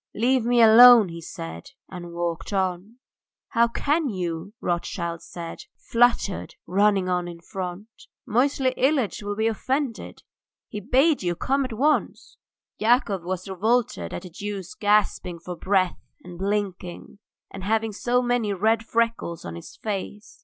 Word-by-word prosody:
"Leave 250 +2 +2
me 240 0 +4
alone," 225 -2 +9
he 170 0 -8
said, 165 +10 -8 0.2
and 175 -2 -9
walked 170 +1 -3
on. 190 +2 -2 0.5
"How 235 -1 +3
can 295 +5 0
you," 175 -2 -4
Rothschild 170 -2 -3
said, 170 -1 -8
fluttered, 235 -5 +1
running 195 0 +2
on 180 -1 0
in 170 -1 -8
front. 180 +3 -6 0.4
"Moisey 260 +3 +1
Ilyitch 265 -7 +1
will 205 0 -4
be 220 +1 0
offended! 255 +3 -2 0.5
He 210 - -5
bade 270 - +2
you 175 -2 -1
come 275 +11 0
at 255 - -6
once!" 290 +7 0 0.4
Yakov 215 -5 +2
was 185 +1 -4
revolted 195 - 0
at - - -6
the 180 - -10
Jew's 200 0 -6
gasping 205 -4 +1
for 175 +2 -7
breath 185 0 +1 0.2
and 175 -1 -11
blinking, 195 -2 -3 0.3
and 195 - -8
having 220 +2 0
so 245 +4 0
many 240 -4 0
red 220 +4 +1
freckles 230 -8 -1
on 85 - -6
his 85 - -10
face. 210 0 -6
205 Hz, 145 wpm, -24 LUFS, 180-235 Hz, 0.5 s, alone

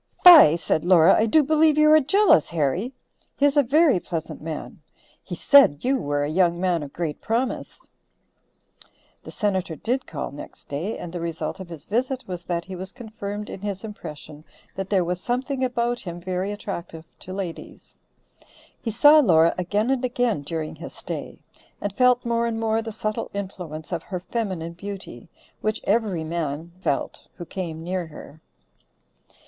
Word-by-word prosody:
"Fie," 320 - +10
said 160 -1 -1
Laura, 175 0 +6
"I 220 - +2
do 305 +7 +4
believe 310 +1 +3
you 305 0 +6
are 310 - +8
jealous, 330 - +4
Harry. 170 - -1 0.5
He 280 - +3
is 285 0 +3
a 290 - +6
very 285 - +4
pleasant 165 -3 -5
man. 155 0 -7 0.4
He - - -6
said 275 - +5
you 265 +1 +2
were 145 0 -1
a - - -1
young 170 0 +2
man 180 -3 +1
of 145 -2 -7
great 160 -2 -4
promise." 240 +3 -3 1.3
The - - -11
Senator 190 -5 -1
did 250 - -2
call - - -5
next 140 - -11
day, 165 +10 -3
and 175 -1 -8
the 175 - -4
result 165 +1 -4
of 185 -2 -8
his 160 -4 -10
visit 255 +4 -1
was 180 -2 -6
that 170 -1 -2
he 190 - -7
was 185 +1 -6
confirmed 210 -3 -7
in 190 - -8
his 200 -1 -4
impression 155 -7 -9 0.3
that 195 0 -5
there 190 -3 +2
was 180 +1 -3
something 260 +3 -2
about 240 -1 0
him 175 -2 -7
very 185 +2 -3
attractive 170 -5 -6
to 185 - -10
ladies. 185 -3 -7 0.9
He 230 - -3
saw 290 +8 +7
Laura 170 - +5
again 205 +7 0
and 265 -1 0
again 245 - 0
during 155 +2 -5
his 165 - -9
stay, - - -7 0.4
and 205 -1 -3
felt 250 -1 +3
more 235 0 +1
and 225 -1 -2
more 225 0 +1
the 225 0 -6
subtle 215 0 -3
influence 180 -6 -6
of 170 -2 -2
her 180 +1 -5
feminine 180 -4 -4
beauty, 200 +2 -8 0.3
which 215 +1 -1
every 200 -6 0
man 160 0 -4
felt 140 - -2
who 175 - -8
came 165 -2 -5
near 180 0 -3
her. 155 0 -12
190 Hz, 175 wpm, -24 LUFS, 170-235 Hz, 1.3 s, Fie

